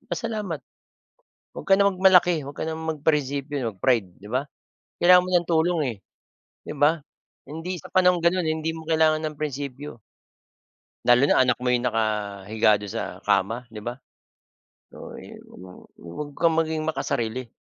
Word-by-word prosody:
pasalamat. 210 - -4 1.0
Huwag - - -8
ka - - +7
na 200 - +5
mag-malaki, 180 -3 +4
huwag 140 +1 -9
ka - - -2
ng 160 0 -4
mag 160 -2 -3
prinsipyo, 145 -1 0 0.2
mag-pride, 115 -1 +2
'di 100 - -15
ba? 130 +2 0 0.6
Kailangan 180 +1 +8
mo 185 - -6
nang 175 -2 +2
tulong, 165 0 +1
eh, - - -18 0.7
'di - - -4
ba? 150 +3 +3 0.5
Hindi 165 +4 -5
sa - - -11
panahong 180 -1 +4
ganon, 175 +2 +2
eh, - - +1
hindi 160 +1 -2
mo 160 - -8
kailangan 160 -1 +3
ng 155 -1 -4
prinsipyo. 140 -3 -5 1.1
Lalo 120 +1 +6
na - - +3
anak 125 -1 +1
mo 125 - -3
ay 125 0 +3
nakahiga 105 -2 0
dun 105 - -8
sa - - -3 0.2
kama, 105 +5 +1
'di 110 -2 -10
ba? 120 +3 -5 1.0
So - - -10
ayun - - -12 0.2
ano, 95 - -11 0.3
huwag 85 - -7
kang 165 -1 +3
maging 160 -1 -1
makasarili, 125 -5 -3
150 Hz, 165 wpm, -24 LUFS, 120-165 Hz, 1.1 s, Kailangan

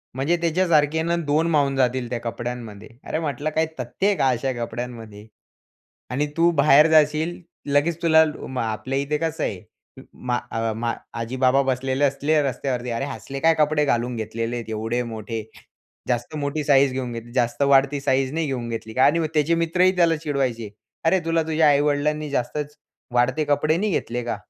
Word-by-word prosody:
म्हणजे 145 +7 +1
त्याच्यासारखानंखे 160 -3 +2
ना 170 +1 0
2 155 +3 +2
मावून 140 -3 +2
जातील 125 -2 0
त्या 120 - -3
कपड्यांमध्ये. 115 -3 -6
अरे, 155 - -3
म्हटलं, 150 -1 -2
"काय 160 +1 +1
तथ्य 125 +10 -2
आहे 205 - +3
का 135 - +2
अशा 130 +2 0
कपड्यांमध्ये? 115 -3 -8 0.8
आणि 140 +4 0
तू 170 +1 +4
बाहेर 150 +1 +6
जाशील 155 +2 +2 0.3
लगेच 160 +3 +2
तुला 160 -1 +6 0.2
मा 130 -3 -2
आपल्या 120 +5 -3
इथे 145 +2 -1
कसं 160 0 -2
आहे 90 - -4 0.5
मा 125 -1 -2
अ, 115 0 -1
मा 115 +1 -1 0.3
आजी 115 +3 -4
बाबा 130 +2 +4
बसलेले 130 +1 0
असले 145 +2 +2
रस्त्यावरती 125 -2 -2
अरे 115 +3 -2
असले 135 0 -7
काय 165 +3 +4
कपडे 150 0 +2
घालून 120 -2 0
घेतलेले 115 +2 -3
आहेत 115 -2 -6
एवढे 110 +3 -2
मोठे? 110 0 -5 0.7
जास्त 120 +4 -2
मोठी 145 +1 -2
साइज 140 -2 +4
घेऊन 130 -2 -4
घेतली. 115 0 -8
जास्त 120 +1 0
वाढती 140 0 +3
साइझ 135 -1 +1
नाही 160 0 -1
घेऊन 125 -4 -3
घेतली 110 -1 -6
का?" 130 - +4
आणि 160 +3 +4
मग 160 - 0
त्याचे 155 +2 +2
मित्रही 180 +3 +2
त्याला 170 -2 +3
चिडवायचे. 135 -8 -2 0.4
"अरे! 190 +3 +4
तुला 165 0 +1
तुझ्या 160 -1 +2
आई-वडिलांनी 145 +1 +1
जास्तच 145 +3 -3 0.4
वाढते 130 +5 +2
कपडे 150 +2 +1
नाही 210 +4 0
घेतले 120 -6 -2
का." 120 - -2
140 Hz, 175 wpm, -23 LUFS, 120-155 Hz, 0.8 s, बाहेर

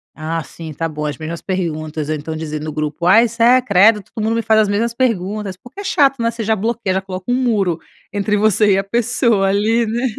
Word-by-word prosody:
ah, 165 +1 -3
sim, 160 -2 -9
tá 165 +3 -2
bom, 150 -1 -5
as 150 - -3
mesmas 160 +1 -6
perguntas". 155 -5 -3
Ou 155 - 0
então 155 +2 -6
dizer 155 -1 -5
no 155 - -4
grupo: 155 +2 -3
"Ai, 225 +6 +6
sé 235 +3 +4
credo 210 0 +4
todo 215 - -4
mundo 225 +1 0
me 230 - 0
faz 220 0 +4
as 210 - 0
mesmas 225 +3 0
perguntas". 210 -5 -1
Porque 245 - -14
é - - -8
chato, 280 -9 +2
né, 230 - +2
você 230 -1 -5
já 220 +1 +1
bloqueia, 210 -3 -1
coloca 185 +2 -7
um - - +3
muro 205 -10 0 0.3
entre 205 +1 0
você 210 -1 +3
e - - +2
a 195 - 0
pessoa 235 -1 +1
ali, 220 +4 +2
né. 240 +4 -1
205 Hz, 230 wpm, -18 LUFS, 165-230 Hz, 0.3 s, Ai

